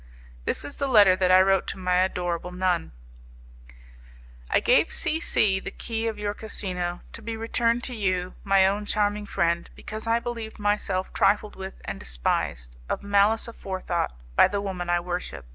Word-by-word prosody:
This - - -1
is 285 - -8
the 280 - -1
letter 205 -7 +7
that 185 -1 +1
I 185 0 +8
wrote 195 0 +2
to - - -4
my 180 -1 +1
adorable 180 -1 -1
nun: 180 -1 0 1.6
"I - - +4
gave - - +3
C 320 - 0
C 195 - +2
the - - -6
key 225 0 -3
of 220 -2 -3
your 205 0 -2
casino, 180 -5 -3
to 230 - -6
be 225 0 -5
returned 230 +1 0
to 250 - -5
you, 185 -3 -1
my 195 -1 +4
own 205 +2 0
charming 205 0 0
friend, 170 -2 0
because 215 +1 -7
I 230 0 +3
believed 235 -2 -5
myself 205 -2 -1
trifled 205 +1 +2
with 190 0 -8
and - - -5
despised, - - -2
of - - -2
malice 205 +3 +3
aforethought, 185 - -3 0.2
by - - +7
the 200 - -2
woman 185 -3 -4
I 175 0 +3
worship. 175 - -5
195 Hz, 175 wpm, -26 LUFS, 180-215 Hz, 1.6 s, I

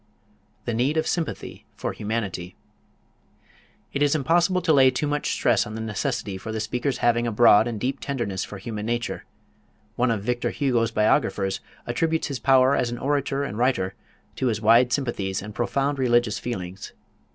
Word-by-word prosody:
The 120 - -1
Need 130 +7 +1
of 160 - +1
Sympathy 165 -3 -4
for - - -3
Humanity 100 -5 -4 1.4
It 140 - -2
is 145 +1 +3
impossible 170 +5 +2
to 165 -3 +3
lay 135 -2 +6
too 130 +4 -2
much 145 0 -1
stress 120 -1 +2
on 105 - -7
the - - -5
necessity 110 -2 -3
for 110 - -6
the 110 - -3
speaker's 125 +5 -2
having 120 0 +3
a - - -1
broad 110 0 +6
and 115 -3 -4
deep 130 +5 -2
tenderness 120 -9 -3
for 105 - -8
human 105 +1 -5
nature. 120 +1 -2 0.7
One 125 +1 +2
of 110 -4 -1
Victor 120 +2 -1
Hugo's 120 -5 +1
biographers 105 -3 +1 0.3
attributes 160 -1 0
his 135 -3 -3
power 135 0 +4
as 120 - 0
an 120 - -4
orator 140 +1 -1
and 125 -6 -4
writer 120 -7 +1 0.4
to 130 - 0
his 110 -3 0
wide 115 +3 +5
sympathies 110 -8 -1
and 105 +2 -8
profound 135 +4 -1
religious 120 -3 +2
feelings. 95 -6 -6
120 Hz, 175 wpm, -24 LUFS, 110-135 Hz, 1.4 s, lay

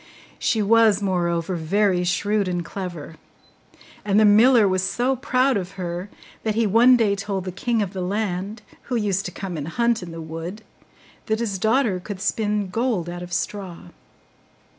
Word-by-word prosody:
She 220 -2 +1
was, 220 -1 +4
moreover, 175 -2 -1
very 180 +2 +1
shrewd 205 +3 0
and 175 -2 -2
clever; 175 -4 -7 0.9
and 205 0 +2
the 215 - +6
miller 220 +2 +6
was 185 -1 +1
so 245 +7 0
proud 255 0 +1
of 190 0 -5
her, 180 0 -5 0.3
that 215 -1 -1
he 230 0 +2
one 235 +5 +6
day 210 -4 +2
told 195 -1 -3
the 185 - -3
king 225 +4 0
of 195 -1 -6
the 190 - -4
land, 200 +2 -3 0.2
who 250 - -3
used 200 -4 0
to 180 - -4
come 180 -1 -6
and 145 0 -5
hunt 235 +5 +1
in 180 - -7
the 165 - -8
wood, 165 +6 -7 0.6
that 220 -1 +1
his 205 -5 -2
daughter 220 -2 +2
could 195 +1 -7
spin 210 -1 -1
gold 225 -6 -1
out 175 0 -7
of 180 0 -8
straw. 180 - -4
200 Hz, 175 wpm, -23 LUFS, 180-220 Hz, 0.9 s, the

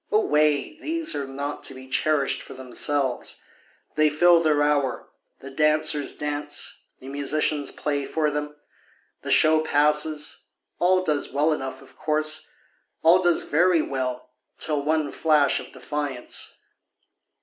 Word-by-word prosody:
Away! 155 - +2
these 330 0 0
are 140 -2 -3
not 140 +2 -5
to 135 - -3
be 130 0 -11
cherish'd 140 +1 0
for - - -11
themselves, 130 +1 -1 0.5
They 155 0 +3
fill 170 +3 +5
their 150 -2 +2
hour, 145 -4 0 0.3
the 135 - -9
dancers 150 0 +2
dance, 145 0 -4 0.2
the 130 - -12
musicians 145 +1 -1
play 145 -2 -2
for 155 -2 0
them, 150 0 -4 0.7
The - - -7
show 155 0 +5
passes, 150 0 0 0.3
all 185 +1 +3
does 150 -5 -1
well 150 +3 +2
enough 135 -2 -5
of 135 - -19
course, 155 0 -1 0.5
All 170 +3 +6
does 175 -2 +2
very 170 +1 +3
well 125 -2 -4 0.3
till 150 -2 -1
one 155 0 0
flash 150 -3 +2
of - - -10
defiance. 145 -4 -5
150 Hz, 135 wpm, -24 LUFS, 140-155 Hz, 0.7 s, All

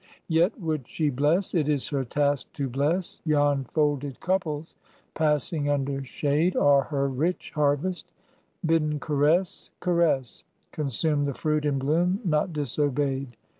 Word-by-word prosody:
Yet 170 +7 +2
would 155 - -2
she 155 -3 -1
bless, 150 +8 +1
it 155 -4 +1
is 145 -3 0
her 140 -3 -1
task 145 +2 0
to 140 -2 -2
bless: 145 +8 -1
Yon 145 -3 +2
folded 145 -1 -1
couples, 165 -4 -2 0.4
passing 150 -1 0
under 140 -1 -1
shade, 150 +6 0
Are 140 -1 +5
her 140 -2 -1
rich 150 +7 -2
harvest; 150 +5 0 0.6
bidden 155 -2 +1
caress, 160 +6 +1
caress, 170 -8 +1 0.3
Consume 145 +1 0
the 140 -2 -2
fruit 155 -1 0
in 145 -2 +1
bloom; 170 +8 +1
not 155 +1 +1
disobeyed. 140 -3 -1
150 Hz, 130 wpm, -26 LUFS, 140-160 Hz, 0.6 s, Are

